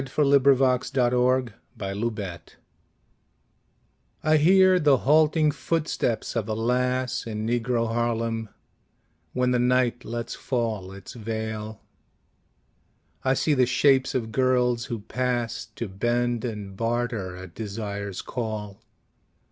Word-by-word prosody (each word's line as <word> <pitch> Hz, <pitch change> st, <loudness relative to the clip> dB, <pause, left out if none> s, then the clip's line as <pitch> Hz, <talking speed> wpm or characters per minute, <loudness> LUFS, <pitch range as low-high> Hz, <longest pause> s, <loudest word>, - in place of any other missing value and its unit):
Claude 140 Hz, +1 st, +3 dB
McKay 130 Hz, -2 st, +3 dB
Harlem 125 Hz, 0 st, +2 dB, 0.3 s
Shadows 100 Hz, -3 st, -4 dB, 1.7 s
I 155 Hz, 0 st, +4 dB
HEAR 185 Hz, +4 st, +5 dB
the 145 Hz, -4 st, +4 dB
halting 155 Hz, +2 st, +3 dB
footsteps 145 Hz, -9 st, -2 dB
of 115 Hz, -2 st, -2 dB
a 110 Hz, -, -1 dB
lass 125 Hz, +2 st, 0 dB
In 110 Hz, -1 st, -3 dB
Negro 120 Hz, 0 st, 0 dB
Harlem 115 Hz, -1 st, -1 dB, 0.8 s
when 125 Hz, 0 st, +1 dB
the 125 Hz, -, +2 dB
night 125 Hz, 0 st, +2 dB
lets 115 Hz, 0 st, -4 dB
fall 115 Hz, -7 st, -2 dB
Its 100 Hz, 0 st, -10 dB
veil. 110 Hz, -1 st, -5 dB, 1.4 s
I 130 Hz, 0 st, +2 dB
see 150 Hz, -, +1 dB
the 130 Hz, -3 st, +3 dB
shapes 130 Hz, +1 st, +3 dB
of 115 Hz, -3 st, -2 dB
girls 125 Hz, 0 st, +2 dB
who 115 Hz, -5 st, -5 dB
pass 125 Hz, 0 st, -2 dB
To 115 Hz, -, -4 dB
bend 120 Hz, +4 st, -1 dB
and 105 Hz, -4 st, -5 dB
barter 115 Hz, -4 st, -2 dB
at 90 Hz, -2 st, -10 dB
desire's 100 Hz, -2 st, -5 dB
call. 110 Hz, -4 st, -5 dB
120 Hz, 115 wpm, -25 LUFS, 110-130 Hz, 1.7 s, HEAR